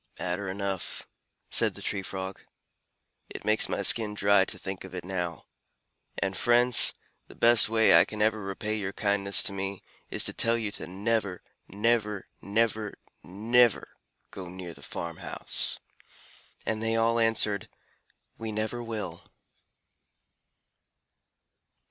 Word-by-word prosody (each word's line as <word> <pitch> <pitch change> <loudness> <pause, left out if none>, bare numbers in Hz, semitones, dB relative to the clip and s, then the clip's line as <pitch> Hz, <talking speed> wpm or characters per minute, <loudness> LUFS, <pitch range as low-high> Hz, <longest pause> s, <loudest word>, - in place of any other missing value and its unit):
"Matter 90 +2 -3
enough," 95 -1 -4 0.4
said - - +4
the - - -10
Tree 100 - -2
Frog. 95 0 -6 0.9
"It - - -9
makes 110 +1 +2
my - - -2
skin 105 -3 +4
dry 100 -1 +3
to - - -5
think 95 -1 -7
of 95 -1 -10
it 90 - -6
now. 90 -4 -4 0.7
And, 95 -1 -2
friends, 120 +3 +6 0.3
the - - -15
best 115 -2 +5
way 110 0 +4
I 85 +1 +7
can 105 +2 -8
ever 110 0 +1
repay 100 +2 -4
your 100 -2 -4
kindness 100 -1 +2
to - - -3
me, 95 0 -5 0.3
is - - -1
to - - +2
tell 115 0 +3
you 110 -3 -3
to - - -7
never, 100 0 -2 0.2
never, 105 -1 -1
never, 110 0 -1 0.3
never 115 +5 +1 0.4
go 95 -2 -8
near 90 -1 -8
the 70 - -14
farm 85 +3 -6
house." - - +2 0.9
And 110 -1 -2
they 115 0 0
all 115 +1 +2
answered, 110 -3 +2 0.7
"We 110 -1 -5
never 110 +3 -3
will." 105 -7 -6
100 Hz, 135 wpm, -27 LUFS, 95-115 Hz, 0.9 s, I